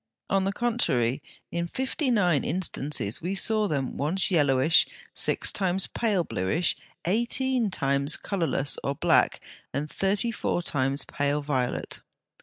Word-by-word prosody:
On 195 -1 +2
the 195 - +1
contrary, 165 - 0 0.3
in 170 0 -2
fifty 265 - -2
nine 180 - +2
instances 150 - -2
we 180 +4 -2
saw 215 +1 +2
them 140 -6 -2
once 180 +8 +1
yellowish, 145 -1 +4 0.3
six - - +4
times 190 -1 0
pale 210 -6 0
bluish, 125 - 0 0.3
eighteen 240 +4 +1
times 140 -3 0
colourless 165 -7 0
or 140 - -1
black, - - +2 0.3
and 140 +3 -2
thirty 195 +7 0
four 175 -5 -2
times 135 -2 0
pale 145 +1 -1
violet. 130 -4 -2
170 Hz, 130 wpm, -26 LUFS, 140-200 Hz, 0.3 s, yellowish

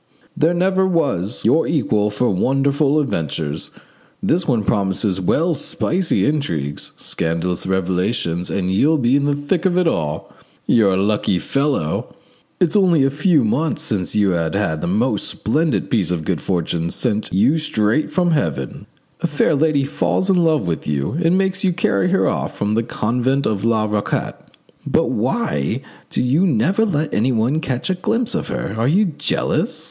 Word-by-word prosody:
There 165 +3 +2
never 190 +1 +2
was 125 - -1
your 165 - +3
equal 110 -9 +1
for 105 +3 0
wonderful 140 +8 +2
adventures. 80 - -3 0.5
This 170 +1 +1
one 120 -7 +1
promises 95 -1 0
well 165 - +1
spicy 170 +4 0
intrigues, 85 - -2
scandalous 85 +3 -2
revelations, 90 -1 -1
and 95 -1 -1
you'll 150 +12 +3
be 125 -1 +2
in 140 0 +2
the 145 0 +1
thick 145 +4 -1
of 180 -2 +1
it 180 - +3
all. 75 - -2 0.3
You're 105 -5 +3
a - - +1
lucky 100 -1 +1
fellow! 135 - -1 0.4
It's 175 0 +2
only 180 -8 +4
a 135 - +2
few 150 0 +2
months 150 +7 0
since 105 - -2
you 100 -2 +3
had 85 -2 -1 0.3
the - - -2
most 105 +4 0
splendid 130 - 0
piece 110 -6 +1
of 85 -3 -2
good - - -1
fortune 85 -2 -1
sent 110 +2 -2
you 120 - +3
straight 115 -1 0
from 175 -2 +1
heaven. 70 - -2 0.3
A - - 0
fair 150 +1 +1
lady 150 -1 +2
falls 185 +6 0
in 185 - +3
love 160 - +2
with 85 -2 -3
you 70 -2 -1
and 170 +3 +3
makes 190 0 0
you 185 -2 +2
carry 175 +1 +1
her 195 - +2
off - - -2
from 105 +1 -1
the 115 - +2
convent 125 +4 -1
of 105 -2 -1
La 110 -2 +2
Raquette. 105 -1 -3 0.3
But - - +1
why 70 -1 -1 0.3
do - - -1
you 145 +10 +2
never 175 - +2
let 155 -6 -1
anyone 120 +5 +1
catch 130 +4 -2
a - - +2
glimpse 225 +6 -1
of - - -2
her? - - -4
Are 115 +2 0
you 190 +9 +3
jealous? 165 -6 -1
125 Hz, 170 wpm, -19 LUFS, 95-160 Hz, 0.5 s, only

